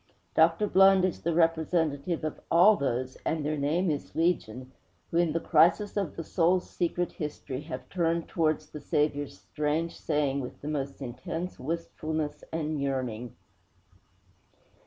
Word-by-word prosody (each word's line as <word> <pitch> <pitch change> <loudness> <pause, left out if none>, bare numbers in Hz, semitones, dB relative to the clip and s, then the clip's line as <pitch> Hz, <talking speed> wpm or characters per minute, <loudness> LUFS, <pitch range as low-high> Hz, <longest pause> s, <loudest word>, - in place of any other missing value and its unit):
Dr. 165 +5 +4
Blund 195 0 +6
is 185 - -2
the 170 - 0
representative 165 -1 +1
of 155 - -3
all 185 +6 +7
those 130 -4 -2
and 160 -2 -1
their 155 +1 0
name 155 +5 +1
is 145 - -5
legion 130 -7 0 0.4
who, 170 - 0
in 170 -2 +3
the 165 - 0
crisis 200 +6 +3
of 195 -8 -2
the 165 - -4
soul's 180 +2 +2
secret 175 0 -1
history, 145 -3 -5
have 130 -4 -6
turned 170 -2 0
towards 155 -3 0
the 150 - -8
Saviour's 145 -5 0
strange 150 - -2
saying 145 -3 0
with 125 -2 -6
the 145 - -6
most 140 -2 -3
intense 165 +8 -5
wistfulness 155 0 -3
and 155 -2 -2
yearning. 125 -4 -3
155 Hz, 145 wpm, -28 LUFS, 140-170 Hz, 0.4 s, all